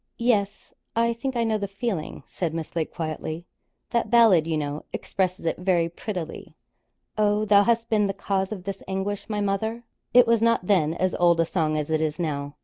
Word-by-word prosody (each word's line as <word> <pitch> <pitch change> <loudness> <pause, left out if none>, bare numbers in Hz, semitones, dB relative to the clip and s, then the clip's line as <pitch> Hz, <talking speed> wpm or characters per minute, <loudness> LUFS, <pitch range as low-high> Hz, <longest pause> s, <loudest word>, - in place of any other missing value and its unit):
'Yes; 210 -4 0 0.2
I 230 0 +2
think 260 +3 -4
I 235 - +1
know 220 -1 0
the 200 - -2
feeling,' 195 -4 -4
said 165 -3 -3
Miss 165 0 -5
Lake, 160 -2 -1
quietly. 160 +1 -4 0.5
'That 235 -2 0
ballad, 220 -9 +5
you 160 -1 0
know, 145 0 -3
expresses 185 -3 -2
it 165 - -1
very 180 -2 +2
prettily: 170 -2 -6 0.6
"Oh, 210 0 +2
thou 205 -1 +6
hast 230 +1 +1
been 210 -3 +2
the 195 - -2
cause 195 0 -1
of 195 -4 -5
this 195 0 -5
anguish, 195 +2 -3
my 210 -1 -1
mother?"' 220 +4 -1 0.3
It 245 0 +7
was 230 -1 +3
not 230 -5 +2
then 170 -5 +2
as 185 +1 0
old 170 -1 +3
a 165 - +4
song 155 -3 0
as 150 +1 -3
it 155 0 +1
is 155 0 -1
now. 145 -3 -3
195 Hz, 200 wpm, -25 LUFS, 165-215 Hz, 0.6 s, It